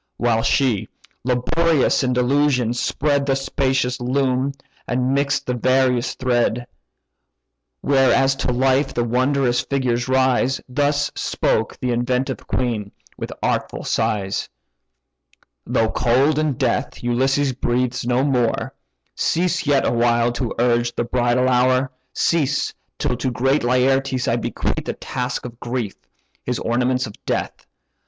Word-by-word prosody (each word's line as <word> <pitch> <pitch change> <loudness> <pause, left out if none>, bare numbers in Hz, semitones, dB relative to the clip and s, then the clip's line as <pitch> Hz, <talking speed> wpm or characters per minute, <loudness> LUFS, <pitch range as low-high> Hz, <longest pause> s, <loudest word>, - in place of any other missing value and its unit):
While 115 -2 +1
she, 120 -4 +1 0.3
laborious 140 +5 +2
in 125 -1 +1
delusion, 125 -1 +2
spread 140 +3 0
The 135 - +2
spacious 130 -1 0
loom, 130 +1 0 0.3
and 125 +1 0
mix'd 140 0 0
the 125 - -1
various 130 0 +1
thread: 120 -1 0 1.2
Where 135 -2 +3
as 135 0 +3
to - - -1
life 135 +2 +1
the 120 - +1
wondrous 125 +1 +1
figures 125 -3 -1
rise, 130 0 +2
Thus 145 +2 0
spoke 110 - -1
the 125 - -1
inventive 125 +2 -1
queen, 110 -5 -2 0.2
with - - -6
artful - - -1
sighs: 105 -3 -1 1.2
"Though 110 -1 +1
cold 135 +5 +2
in 155 -2 +1
death 125 -3 -2
Ulysses 135 +3 +1
breathes 125 0 -1
no 125 +2 +1
more, 125 -5 0 0.4
Cease 170 -1 0
yet 140 -2 +3
awhile 120 0 +2
to 120 0 -3
urge 120 0 +1
the - - 0
bridal 120 +1 +1
hour: 130 +1 +2 0.2
Cease, 150 -4 0 0.2
till - - -1
to 130 - -1
great 135 +3 +1
Laertes 130 +1 +1
I 115 - +2
bequeath 120 - -3
A - - 0
task 125 0 -4
of 120 -1 -9
grief, 120 -4 -3 0.5
his - - -2
ornaments 125 +2 0
of 110 - -8
death. - - -3
125 Hz, 130 wpm, -21 LUFS, 120-135 Hz, 1.2 s, Where